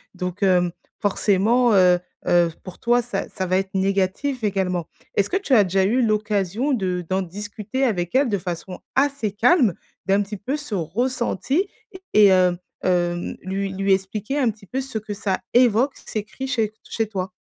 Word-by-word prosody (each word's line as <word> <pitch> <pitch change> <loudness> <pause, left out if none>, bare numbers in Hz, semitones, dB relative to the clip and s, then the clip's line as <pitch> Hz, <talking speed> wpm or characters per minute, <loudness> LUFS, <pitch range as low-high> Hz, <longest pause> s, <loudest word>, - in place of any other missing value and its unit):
Donc, 180 +2 -4
hem, 180 -2 +3 0.3
forcément, 215 +4 +2
heu, 180 -2 +6 0.3
heu, 175 -1 +4
pour 185 - -9
toi 240 +1 +3
ça 195 -4 -4
ça 190 - -3
va 185 +1 +1
être 190 0 -2
négatif 195 +7 0
également. 185 -4 0 0.3
Est-ce 200 - +2
que 380 - +1
tu 385 -8 -1
as 215 -5 +7
déjà 190 +1 +1
eu 240 +6 +2
l'occasion 215 +4 0
de 180 -6 -1
d'en 190 +1 +1
discuter 205 +6 -4
avec 175 -6 -1
elle 275 +1 +4
de 205 - +1
façon 180 0 -6 0.2
assez 275 -6 +1
calme, 225 - +3 0.3
d'un 195 +1 +3
petit 205 +1 -5
peu 255 +9 -3
ce 290 -8 -5
ressenti 245 - -1 0.5
et 210 -1 +7
hem, 185 -2 +4 0.3
hem, 175 -1 0
lui 195 +1 -2
lui 195 0 +2
expliquer 205 +8 -2
un 255 -4 +3
petit 205 -1 -17
peu 260 +7 -3
ce 260 -4 -5
que 215 -1 -5
ça 200 -2 -1
évoque 245 +2 +4
ces 215 - -3
cris 265 +5 -6
chez 225 -5 0
chez 225 -1 -2
toi? 190 -3 -4
200 Hz, 180 wpm, -22 LUFS, 185-235 Hz, 0.5 s, as